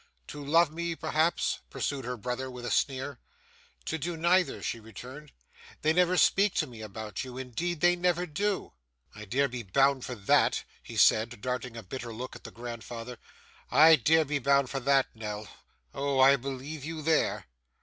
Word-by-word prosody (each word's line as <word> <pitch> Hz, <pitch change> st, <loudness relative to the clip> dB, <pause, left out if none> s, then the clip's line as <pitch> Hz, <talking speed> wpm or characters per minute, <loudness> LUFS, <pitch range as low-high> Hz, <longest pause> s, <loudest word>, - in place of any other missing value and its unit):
'To 145 Hz, -, -8 dB
love 165 Hz, +2 st, +4 dB
me, 170 Hz, +1 st, -3 dB
perhaps?' 160 Hz, +1 st, 0 dB
pursued 135 Hz, -3 st, -3 dB
her 125 Hz, 0 st, -4 dB
brother 125 Hz, +4 st, -4 dB
with 125 Hz, -1 st, -8 dB
a 120 Hz, -, -3 dB
sneer. 135 Hz, +5 st, -1 dB, 0.7 s
'To 160 Hz, -, -2 dB
do 170 Hz, +3 st, -3 dB
neither,' 175 Hz, +2 st, +2 dB
she 115 Hz, -, -2 dB
returned. 130 Hz, +6 st, -11 dB, 0.5 s
'They 155 Hz, +1 st, +4 dB
never 180 Hz, +1 st, +3 dB
speak 200 Hz, +2 st, +4 dB
to 160 Hz, -, +2 dB
me 120 Hz, -5 st, -11 dB
about 110 Hz, 0 st, -6 dB
you. 130 Hz, -1 st, -8 dB
Indeed 150 Hz, +6 st, -3 dB
they 175 Hz, 0 st, +5 dB
never 180 Hz, 0 st, +1 dB
do.' 195 Hz, +5 st, -2 dB, 0.4 s
'I 105 Hz, -, -9 dB
dare 135 Hz, +7 st, +1 dB
be 125 Hz, -2 st, -5 dB
bound 135 Hz, +6 st, +2 dB
for 125 Hz, -, -5 dB
that,' 100 Hz, -3 st, +2 dB, 0.2 s
he -, -, -9 dB
said, 115 Hz, +2 st, +4 dB
darting 125 Hz, -1 st, -3 dB
a 115 Hz, -, -7 dB
bitter 120 Hz, +4 st, -6 dB
look 125 Hz, +3 st, -7 dB
at -, -, -13 dB
the -, -, -6 dB
grandfather. 120 Hz, 0 st, -8 dB, 0.5 s
'I 155 Hz, +4 st, +7 dB
dare 160 Hz, +5 st, +3 dB
be 145 Hz, 0 st, -1 dB
bound 140 Hz, 0 st, +2 dB
for 135 Hz, -, -2 dB
that 135 Hz, +1 st, +3 dB
Nell. 105 Hz, -1 st, -6 dB, 0.5 s
Oh! 140 Hz, -1 st, -1 dB
I 135 Hz, +1 st, +7 dB
believe 135 Hz, +3 st, -6 dB
you 160 Hz, 0 st, -5 dB
there! 160 Hz, 0 st, +1 dB
135 Hz, 180 wpm, -29 LUFS, 120-160 Hz, 0.7 s, I